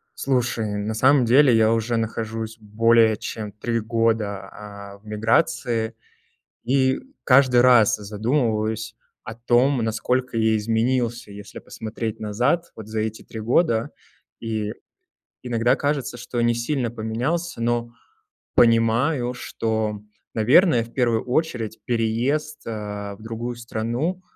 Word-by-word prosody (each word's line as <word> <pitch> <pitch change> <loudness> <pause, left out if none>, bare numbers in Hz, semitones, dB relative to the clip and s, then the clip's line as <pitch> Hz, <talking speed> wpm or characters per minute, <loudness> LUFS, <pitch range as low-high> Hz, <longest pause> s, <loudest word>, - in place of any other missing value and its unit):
Слушай, 120 -5 -1
на 105 +2 -2
самом 130 +3 +4
деле 125 +1 +5
я 110 0 +4
уже 115 +1 0
нахожусь 110 0 -4
более 110 +1 +3
чем 105 0 -6
3 115 +3 -2
года, 110 -2 -1
а, 100 -1 -10
в 105 - -28
миграции, 110 +1 0 0.7
и 130 0 +2 0.2
каждый 125 -2 +5
раз 120 -4 +6
задумываюсь 110 0 -1 0.3
о 115 - -7
том, 120 +3 +2
насколько 120 +2 -1
я 110 -1 +3
изменился, 115 +1 -1
если 100 +1 -10
посмотреть 110 0 -6
назад, 120 +11 0
вот 110 -2 -10
за 110 0 -3
эти 110 0 -4
3 110 - -9
года. 115 0 +1 0.5
И 110 -2 -3 0.7
иногда 120 -1 +1
кажется, 140 -4 -2
что 120 0 -4
не 120 0 +2
сильно 120 +1 -1
поменялся, 120 +9 -3
но 120 0 0 0.7
понимаю, 120 +3 +3
что, 110 -3 -3 0.3
наверное, 125 - +4
в 115 - -13
первую 120 -3 +1
очередь 125 -5 -2
переезд, 125 +7 -1
э, 105 -2 -5
в 100 - -18
другую 115 +2 -5
страну, 120 +9 -3
115 Hz, 125 wpm, -23 LUFS, 110-125 Hz, 0.7 s, раз